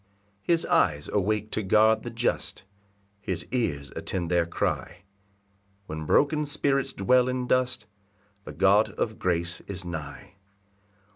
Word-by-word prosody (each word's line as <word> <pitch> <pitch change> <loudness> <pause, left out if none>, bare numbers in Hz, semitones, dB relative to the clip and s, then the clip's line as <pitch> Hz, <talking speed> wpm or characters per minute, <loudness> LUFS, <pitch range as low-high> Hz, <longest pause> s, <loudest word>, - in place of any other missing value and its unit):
3 175 - +4
His 165 - +2
eyes 75 -4 +2
awake 105 +1 0
to - - 0
guard 110 +2 +4
the 120 - -6
just, 120 -3 -2 0.6
His 95 -3 -4
ears 80 - -2
attend 90 -2 -3
their 85 -1 +2
cry; 85 - -3 0.8
When 80 -2 -6
broken 150 +1 +2
spirits 140 -2 0
dwell 125 +5 +3
in 125 0 -2
dust, 125 -3 0 0.6
The - - -9
God 100 +3 +4
of 110 -2 -3
grace 85 -1 -1
is 95 -2 -4
nigh. 85 +3 -7
105 Hz, 135 wpm, -26 LUFS, 90-125 Hz, 0.8 s, 3